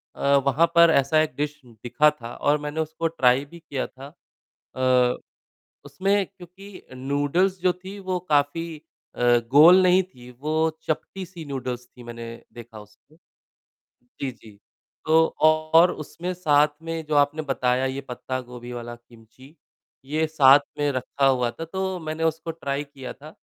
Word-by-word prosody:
अ, 140 0 +2
वहाँ 140 +4 +4
पर 170 0 +7
ऐसा 140 +3 +3
एक 155 - -2
डिश 150 +1 -3
दिखा 120 +6 +1
था 120 -5 -10
और 145 +1 +1
मैंने 150 +1 -5
उसको 160 +1 -2
ट्राई 135 -4 +2
भी 170 +4 -14
किया 140 -5 -4
था। 135 +1 -12 0.7
अ, 125 -1 +2 0.7
उसमें 195 +1 0
क्योंकि 185 +3 -14
नूडल्स 145 +8 0
जो 180 0 +3
थी 195 +2 -8
वो 185 -1 -2
काफ़ी 155 +3 0 0.4
अ, - - -6 0.3
गोल 170 +7 +8
नहीं 185 +1 +5
थी 125 -9 -16
वो 155 +2 -2 0.3
चपटी-सी 175 +1 -5
नूडल्स 125 -3 -5
थी 125 - -16
मैंने 120 0 -8 0.3
देखा 115 -2 -11
उसको 105 +9 -22 0.9
जी, 125 +2 -6
जी, 110 -4 -16 0.5
तो 160 +1 +5 0.2
और 155 +2 +4
उसमें 170 +4 -6
साथ 150 -4 +3
में 165 -1 -5
जो 155 - -2
आपने 145 +2 +2
बताया 130 -2 0
ये 135 +1 -3
पत्ता-गोभी 125 -1 -6
वाला 120 0 -6
किमची, 120 +5 -19 0.5
ये 155 +4 -1
साथ 145 -3 +6 0.2
में 145 -1 +1
रखा 135 +2 -1
हुआ 125 -3 +2
था 165 - -7
तो 190 +2 -3
मैंने 155 0 -4
उसको 160 +1 -1
ट्राई 145 -3 -4
किया 140 -3 -9
था। 150 - -14
145 Hz, 155 wpm, -24 LUFS, 130-165 Hz, 0.9 s, गोल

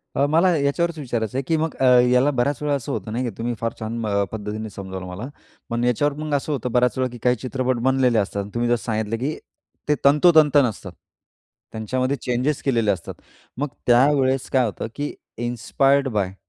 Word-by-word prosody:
अ, 140 - +3
मला 170 +3 +4
याच्यावरच 160 +4 0
विचारायचं 120 -3 -3
आहे, 135 - -1
की 165 - +2
मग 160 0 -2
अ, 135 - +2 0.3
याला 125 +3 +4
बऱ्याच 135 +3 0
वेळेला 145 -1 +1
असं 135 -4 -4
होत - - -2
नाही 115 +4 -2
की - - -1
तुम्ही 120 +1 -2
फार 115 0 -1
छान 115 +1 -4 0.3
पद्धतीने 110 0 -5
समजावलं 95 -2 -7
मला. 90 +7 -6 0.4
पण 115 +1 -1
याच्यावर 125 +4 +1
मग 155 -1 -3
असं 145 +2 -2
होतं, 125 -4 -2
बऱ्याच 125 0 +2
वेळा 130 -1 -2
काही 125 0 +3
चित्रपट 130 -1 -1
बनलेले 130 -3 +2
असतात. 100 0 -2
तुम्ही 120 0 0
जसं 120 -1 +1
सांगितलं, 110 -1 -1
की 140 +6 -2 0.5
ते 150 - +4
तंतोतंत 150 0 +6
नसतं. 110 -5 -3 0.8
त्यांच्यामध्ये 130 +5 -1
चेंजेस 125 +4 -1
केलेले 115 -6 +2
असतात. 90 -4 -5 0.4
मग 145 +3 -1 0.2
त्यावेळेस 130 +1 +3
काय 130 -2 +3
होतं 110 0 -4
की 145 0 -3 0.2
इन्स्पायर्ड 125 +4 +1
बाय? 100 -5 -1
125 Hz, 180 wpm, -22 LUFS, 115-140 Hz, 0.8 s, तंतोतंत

